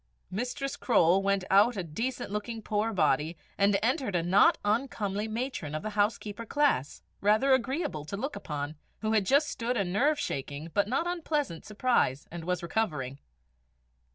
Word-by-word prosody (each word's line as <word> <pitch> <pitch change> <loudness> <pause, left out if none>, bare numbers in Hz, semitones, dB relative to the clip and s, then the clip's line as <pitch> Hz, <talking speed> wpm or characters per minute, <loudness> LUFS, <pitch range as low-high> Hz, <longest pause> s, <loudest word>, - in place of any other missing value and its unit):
Mistress 270 +7 -3
Croale 185 -5 +4
went 200 -1 +1
out 210 +4 +5
a 190 - -1
decent 230 +9 -4
looking 215 +2 -4
poor 215 +2 0
body, 165 -4 +1 0.2
and 200 0 +3
entered 245 -4 0
a 170 - +1
not 185 +4 +5
uncomely 210 -2 -1
matron 220 - -3
of 155 - -4
the 215 - -3
housekeeper 210 +1 -1
class, 255 - 0 0.2
rather 215 +7 +4
agreeable 260 - -1
to 200 - -5
look 275 +7 -3
upon, 150 0 -5 0.2
who 215 0 0
had 210 -4 +2
just 285 +2 +4
stood 240 +1 -2
a 200 - +2
nerve 250 +12 +2
shaking 145 - -4
but 205 0 +2
not 265 +9 0
unpleasant 310 - -2
surprise, 210 - +1
and 170 -1 -7
was 180 -1 -1
recovering. 150 - -2
210 Hz, 160 wpm, -29 LUFS, 175-250 Hz, 0.2 s, out